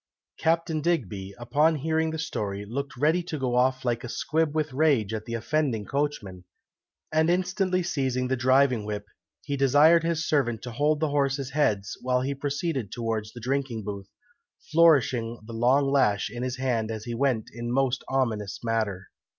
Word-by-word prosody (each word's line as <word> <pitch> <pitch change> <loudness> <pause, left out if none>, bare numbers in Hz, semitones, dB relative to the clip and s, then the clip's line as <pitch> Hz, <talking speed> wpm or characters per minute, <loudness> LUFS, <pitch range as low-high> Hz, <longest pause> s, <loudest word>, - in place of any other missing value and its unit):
Captain 165 -1 +1
Digby, 100 - -2
upon 145 +7 +2
hearing 160 +2 0
the 160 - -4
story, 105 -10 -3
looked 125 +3 -5
ready 155 +6 +2
to 170 -3 -5
go 130 -3 -1
off 130 +1 +2
like 120 0 0
a 120 - -6
squib 160 +3 -1
with 155 -3 -1
rage 130 -8 +2
at 110 -1 -4
the 115 - -4
offending 125 -3 -1
coachman, 115 -11 -3 0.7
and 160 +1 +3
instantly 185 +1 +1
seizing 130 -6 -1
the 130 - +1
driving 130 -2 +3
whip, 105 -1 -4 0.4
he 140 - -2
desired 145 +5 +5
his 165 -1 -1
servant 120 -7 0
to 125 - -6
hold 150 +5 +1
the 155 -1 0
horses' 140 -1 0
heads, 105 -8 0
while 125 0 +1
he 135 +2 -1
proceeded 140 - -3
towards 110 -3 -3
the 120 - -9
drinking 125 -2 -2
booth, 100 -1 -6 0.6
flourishing 130 -8 +4
the 115 - -9
long 125 +5 +3
lash 105 -7 +2
in 120 +1 -6
his 130 0 -3
hand 120 -4 -1
as 110 -1 -5
he 120 - -5
went 125 -3 0
in 120 +1 -5
a - - -2
most 135 0 +1
ominous 110 -7 -1
manner. 110 -5 -1
130 Hz, 175 wpm, -26 LUFS, 115-150 Hz, 0.7 s, desired